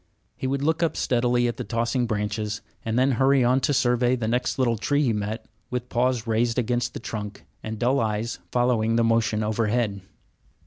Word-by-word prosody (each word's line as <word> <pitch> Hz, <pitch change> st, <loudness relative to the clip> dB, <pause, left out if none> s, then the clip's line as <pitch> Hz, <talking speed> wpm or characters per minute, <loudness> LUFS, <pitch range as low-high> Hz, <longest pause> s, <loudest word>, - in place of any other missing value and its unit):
He 130 Hz, -, -3 dB
would 140 Hz, +1 st, -1 dB
look 160 Hz, +3 st, +1 dB
up 165 Hz, -, 0 dB
steadily 120 Hz, 0 st, +2 dB
at 120 Hz, -, -3 dB
the -, -, -3 dB
tossing 120 Hz, +2 st, -1 dB
branches, 105 Hz, -1 st, -2 dB, 0.2 s
and 115 Hz, +1 st, -1 dB
then 130 Hz, +2 st, +3 dB
hurry 135 Hz, +2 st, +3 dB
on 125 Hz, +2 st, +3 dB
to 145 Hz, -, 0 dB
survey 125 Hz, -2 st, +2 dB
the 115 Hz, -3 st, -3 dB
next 125 Hz, +2 st, 0 dB
little 125 Hz, -3 st, +2 dB
tree 145 Hz, +7 st, +1 dB
he 120 Hz, -5 st, +2 dB
met, 105 Hz, +2 st, -3 dB, 0.2 s
with 125 Hz, 0 st, -4 dB
paws 125 Hz, -1 st, +1 dB
raised 115 Hz, +1 st, +1 dB
against 120 Hz, 0 st, 0 dB
the -, -, -4 dB
trunk 105 Hz, -2 st, -6 dB, 0.2 s
and 110 Hz, 0 st, -5 dB
dull 125 Hz, +5 st, +2 dB
eyes 110 Hz, +1 st, -2 dB
following 120 Hz, -2 st, +2 dB
the 115 Hz, -, +3 dB
motion 115 Hz, -1 st, +2 dB
overhead. 110 Hz, -1 st, 0 dB
120 Hz, 190 wpm, -25 LUFS, 110-125 Hz, 0.2 s, then